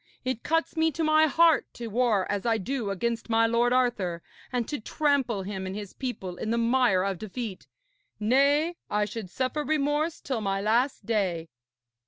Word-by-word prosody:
It 255 -3 -2
cuts 325 +2 0
me 320 0 +2
to 325 - -2
my 310 0 +5
heart 330 +2 +4
to 240 - -6
war 225 -3 +1
as 205 -1 -2
I 230 -1 +2
do 230 +1 -3
against 230 +5 -2
my 225 0 +4
lord 235 +1 +2
Arthur, 220 -9 0 0.3
and 245 -3 -1
to 295 - -3
trample 265 -5 0
him 190 -1 -5
and 190 - -5
his 205 -2 -7
people 195 -9 -5
in 220 - -4
the 230 - +1
mire 235 -5 +3
of 195 -3 -2
defeat 215 -1 -6 0.5
nay, 280 +9 +3
I 210 0 +1
should 210 -3 -6
suffer 260 - -2
remorse 300 +2 0
till 255 -5 -3
my 195 -1 -1
last 225 +3 +1
day.' 185 -7 -1
235 Hz, 180 wpm, -27 LUFS, 205-275 Hz, 0.5 s, my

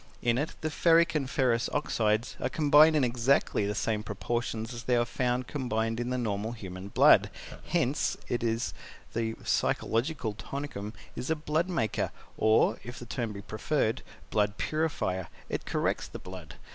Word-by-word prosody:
In 120 +1 +2
it 150 - -2
the 155 - -1
Ferric 165 +2 +4
and 140 -4 -1
Ferrous 125 -4 +2
Oxides 110 -6 0
are 125 - -1
combined 150 +2 +6
in 150 - +3
exactly 120 -3 +2
the 105 - -2
same 110 0 0
proportions 115 +2 -3
as 120 0 -7
they 125 - +3
are 120 0 +3
found 125 +1 -1
combined 115 -5 -1
in 120 0 -2
the 125 - 0
normal 110 -1 -2
human 95 -4 -7
blood; 100 - +6 0.4
hence - - +1
it 120 - -1
is 115 +1 0 0.4
that - - -1
the 110 -1 -1
Physiological 115 +1 0
Tonicum 105 -1 -6 0.2
is 125 - -4
a 160 - +3
blood 155 +3 -1
maker, 135 - 0 0.3
or, 110 0 +3
if 120 +1 -8
the 120 - -8
term 115 -1 -3
be 100 -1 -8
preferred, 115 +1 0 0.3
blood 105 -1 +1
purifier 145 - -1 0.2
it - - -3
corrects - - -1
the - - -8
blood. 90 -6 -10
120 Hz, 170 wpm, -29 LUFS, 110-140 Hz, 0.4 s, combined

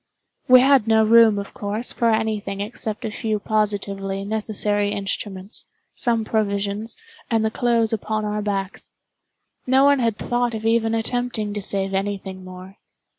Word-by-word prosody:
We 255 0 +8
had 265 -4 +4
no 220 0 +4
room, 225 -1 +6
of 200 0 -6
course, 210 +4 -2
for 235 - +1
any 220 -1 +1
thing 195 -1 -6
except 215 +1 -5
a 220 - -3
few 220 -1 -2
positively 200 -2 -1
necessary 210 -1 0
instruments, 195 0 -4 0.3
some 230 -2 +3
provisions, 205 - -1 0.3
and 225 -2 +1
the 220 - 0
clothes 230 -1 +1
upon 215 0 -2
our 210 0 -2
backs. 195 -2 -3 0.8
No 265 +2 +4
one 285 -1 +4
had 230 -3 0
thought 240 -1 -1
of 220 0 -6
even 225 0 +2
attempting 225 -2 -2
to 205 - -4
save 195 0 -1
any 200 +1 -1
thing 190 -1 -9
more. 185 +1 -11
215 Hz, 160 wpm, -22 LUFS, 200-225 Hz, 0.8 s, We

